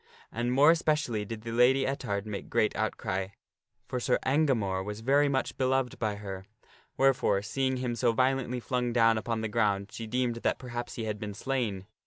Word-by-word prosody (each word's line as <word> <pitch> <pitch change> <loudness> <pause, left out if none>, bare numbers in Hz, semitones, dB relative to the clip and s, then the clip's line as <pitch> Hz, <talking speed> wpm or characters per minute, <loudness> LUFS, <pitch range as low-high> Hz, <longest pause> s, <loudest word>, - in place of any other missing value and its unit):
And 120 +1 -1
more 140 +5 +6
especially 150 -10 0
did 110 +1 -6
the 115 - -5
Lady 125 +3 +4
Ettard 105 -7 -2
make 105 -2 -6
great - - +1
outcry; 95 0 -2 0.6
for 125 - -2
Sir - - +2
Engamore 125 -10 +1
was 105 +2 -6
very 140 +4 +3
much 130 -2 -1
beloved 130 -1 0
by 110 -3 -1
her; 95 -2 -7 0.5
wherefore, 135 -7 +3
seeing 130 +4 -1
him 125 -2 -2
so 120 0 +2
violently 130 +1 +1
flung 125 0 -1
down 115 -2 +4
upon 115 0 -2
the 110 - -1
ground, 105 -3 0
she 115 - -6
deemed 120 0 0
that - - 0
perhaps 120 -1 -6
he 115 - -4
had 105 -1 -3
been 105 -2 -5
slain. 115 -7 -2
120 Hz, 185 wpm, -29 LUFS, 105-130 Hz, 0.6 s, more